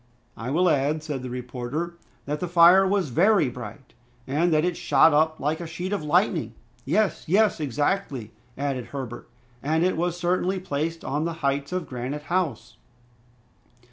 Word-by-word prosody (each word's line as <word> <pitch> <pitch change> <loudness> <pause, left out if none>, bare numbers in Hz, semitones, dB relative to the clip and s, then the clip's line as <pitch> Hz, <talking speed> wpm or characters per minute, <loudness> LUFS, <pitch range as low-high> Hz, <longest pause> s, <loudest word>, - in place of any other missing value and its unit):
"I 115 +2 -5
will 175 +6 +2
add," 150 0 +1
said 145 -4 -4
the 130 - -6
reporter, 125 +7 -4 0.3
"that 150 +1 -3
the 180 - -2
fire 175 +3 +6
was 195 -5 +1
very 180 - +3
bright, 125 +1 -10 0.3
and 155 +6 +1
that 155 +1 +3
it 180 -1 0
shot 165 - +4
up 155 +1 +2
like 150 +3 -1
a 170 - -5
sheet 180 +4 -4
of 205 - -1
lightning." 155 - +1 0.3
"Yes, 200 +8 +1
yes! 205 +3 +3
exactly," 145 - -1 0.3
added 135 -3 -2
Herbert, 130 -2 -7 0.3
"and 160 +3 +1
it 185 - +1
was 175 +1 -1
certainly 180 +2 0
placed 165 -1 -3
on 150 +3 -1
the 170 - -2
heights 140 +2 0
of 180 -2 -3
Granite 130 +4 -5
House." 170 -11 -1
155 Hz, 165 wpm, -25 LUFS, 135-175 Hz, 0.3 s, fire